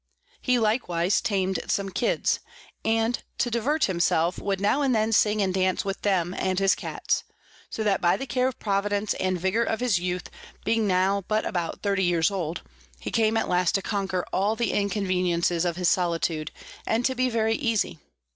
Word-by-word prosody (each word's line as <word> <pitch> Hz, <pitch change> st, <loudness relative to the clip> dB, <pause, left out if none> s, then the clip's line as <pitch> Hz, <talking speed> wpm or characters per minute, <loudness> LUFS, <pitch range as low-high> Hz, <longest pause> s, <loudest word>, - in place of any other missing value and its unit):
He 250 Hz, 0 st, +2 dB
likewise 210 Hz, -5 st, +1 dB
tam'd 190 Hz, -2 st, 0 dB
some 200 Hz, -1 st, -1 dB
Kids, -, -, 0 dB, 0.4 s
and 225 Hz, +2 st, +1 dB, 0.2 s
to 240 Hz, -, 0 dB
divert 280 Hz, +7 st, 0 dB
himself 170 Hz, -2 st, +1 dB
would 195 Hz, -1 st, -2 dB
now 205 Hz, +8 st, +2 dB
and 265 Hz, -4 st, +2 dB
then 220 Hz, 0 st, +1 dB
sing 210 Hz, 0 st, +3 dB
and 190 Hz, -1 st, 0 dB
dance 185 Hz, 0 st, +1 dB
with 195 Hz, 0 st, -3 dB
them 180 Hz, -3 st, +1 dB
and 185 Hz, -1 st, 0 dB
his 195 Hz, 0 st, +4 dB
Cats: -, -, -2 dB, 0.5 s
so 220 Hz, -, -3 dB
that 200 Hz, -3 st, +1 dB
by 175 Hz, -, +3 dB
the 270 Hz, -, -4 dB
Care 255 Hz, 0 st, +1 dB
of 260 Hz, -, -4 dB
Providence 205 Hz, 0 st, 0 dB
and 185 Hz, -1 st, 0 dB
Vigour 190 Hz, +6 st, +1 dB
of 225 Hz, -1 st, 0 dB
his 240 Hz, -7 st, +2 dB
Youth, 180 Hz, 0 st, -3 dB, 0.3 s
being 225 Hz, -1 st, +2 dB
now 190 Hz, +1 st, +2 dB
but 215 Hz, 0 st, 0 dB
about 170 Hz, -2 st, -3 dB
30 200 Hz, -2 st, +1 dB
years 175 Hz, +1 st, +2 dB
old, 175 Hz, -4 st, -3 dB, 0.4 s
he -, -, -5 dB
came 225 Hz, 0 st, +2 dB
at -, -, 0 dB
last 180 Hz, -1 st, +2 dB
to 195 Hz, -, 0 dB
conquer 195 Hz, -3 st, -2 dB
all 205 Hz, +4 st, +1 dB
the 235 Hz, -2 st, 0 dB
Inconveniences 180 Hz, -4 st, 0 dB
of 170 Hz, -1 st, 0 dB
his 180 Hz, 0 st, 0 dB
Solitude, 165 Hz, -3 st, 0 dB, 0.4 s
and 230 Hz, +2 st, +1 dB
to 260 Hz, -, +2 dB
be 255 Hz, 0 st, +1 dB
very 225 Hz, -1 st, +1 dB
easy. 225 Hz, -, -1 dB
195 Hz, 185 wpm, -26 LUFS, 180-225 Hz, 0.5 s, his